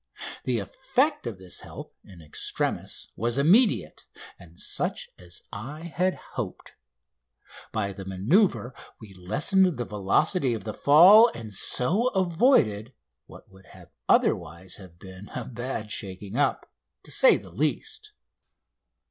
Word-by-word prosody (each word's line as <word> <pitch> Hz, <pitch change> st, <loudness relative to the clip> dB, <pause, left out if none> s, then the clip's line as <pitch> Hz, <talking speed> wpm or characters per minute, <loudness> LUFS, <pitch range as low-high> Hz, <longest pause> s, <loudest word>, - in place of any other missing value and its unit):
The -, -, 0 dB
effect 295 Hz, -, -1 dB
of 110 Hz, -5 st, -5 dB
this 95 Hz, -1 st, -6 dB
help -, -, -10 dB
in 90 Hz, -4 st, -15 dB
extremis 75 Hz, -, -3 dB
was 120 Hz, +3 st, -1 dB
immediate, 165 Hz, -, +3 dB, 0.3 s
and 85 Hz, -1 st, -16 dB
such -, -, -1 dB
as 90 Hz, -1 st, -10 dB
I 135 Hz, +10 st, -7 dB
had 175 Hz, +2 st, -1 dB, 0.2 s
hoped. -, -, -6 dB, 1.0 s
By 100 Hz, -2 st, -2 dB
the 95 Hz, -, -9 dB
manoeuvre 125 Hz, -, +1 dB, 0.3 s
we 105 Hz, -4 st, -13 dB
lessened 165 Hz, -, +2 dB
the 120 Hz, -, -3 dB
velocity 115 Hz, -, +1 dB
of 110 Hz, -, -7 dB
the 110 Hz, -, -5 dB
fall, 185 Hz, +11 st, +7 dB
and 110 Hz, -3 st, -9 dB
so 175 Hz, -, +1 dB
avoided 165 Hz, -, +2 dB, 0.3 s
what -, -, -15 dB
would 95 Hz, 0 st, -19 dB
have -, -, -16 dB, 0.2 s
otherwise 85 Hz, +3 st, +1 dB
have 90 Hz, -4 st, -14 dB
been 95 Hz, +2 st, -12 dB
a -, -, -4 dB
bad 120 Hz, -3 st, -5 dB
shaking 100 Hz, 0 st, -3 dB
up, 145 Hz, +2 st, -1 dB, 0.3 s
to -, -, -7 dB
say -, -, +6 dB
the -, -, -13 dB
least. 430 Hz, -1 st, -3 dB
115 Hz, 130 wpm, -26 LUFS, -, 1.0 s, fall